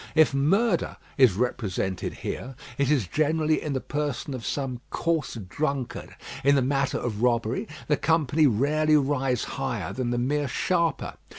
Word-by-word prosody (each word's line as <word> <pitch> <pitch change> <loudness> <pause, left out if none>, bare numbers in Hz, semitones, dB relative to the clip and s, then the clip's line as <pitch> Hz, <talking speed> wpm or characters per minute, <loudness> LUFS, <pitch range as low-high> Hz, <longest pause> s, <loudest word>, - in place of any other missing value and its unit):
If 155 -3 +5
murder 175 +8 +2 0.2
is 130 -7 +6
represented 95 -4 -2
here, 130 +1 -4 0.2
it 140 -1 +2
is 140 -9 +3
generally 155 - +1
in 150 - -3
the 130 - 0
person 145 -1 -3
of 125 -3 -5
some 130 +1 -3
coarse 165 -6 -1
drunkard; 130 +6 -3 0.3
in 140 +1 +5
the 135 - +3
matter 135 0 +1
of 110 -3 -3
robbery, 120 -1 +1 0.2
the 150 - +2
company 155 -2 +3
rarely 150 +6 +3
rise 135 -3 +1
higher 125 -10 -3
than 130 -2 -2
the 120 - 0
mere 145 +4 0
sharper. 165 +2 0
135 Hz, 155 wpm, -26 LUFS, 125-150 Hz, 0.3 s, is